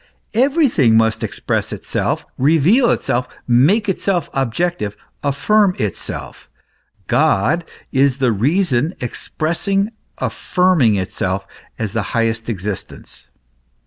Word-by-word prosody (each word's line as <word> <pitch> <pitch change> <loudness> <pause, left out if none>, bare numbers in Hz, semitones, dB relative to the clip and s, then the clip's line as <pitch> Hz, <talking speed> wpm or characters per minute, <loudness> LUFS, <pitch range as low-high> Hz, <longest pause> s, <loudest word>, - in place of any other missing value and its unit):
Everything 240 - +3
must 110 0 +2
express - - -2
itself, - - -2
reveal 165 - +4
itself, 125 +1 0 0.2
make 150 - +4
itself 190 -2 -1
objective, 135 - -1 0.2
affirm 190 +7 +2
itself. 105 -5 -5 0.6
God 150 - +2 0.3
is 135 -1 +3
the 130 -3 +2
reason 145 - +1
expressing, 195 - -2 0.3
affirming 180 - +2
itself 95 -2 -2 0.3
as 110 -3 -3
the 110 - 0 0.2
highest 115 0 0
existence. 95 - -6
140 Hz, 95 wpm, -18 LUFS, 115-185 Hz, 0.6 s, reveal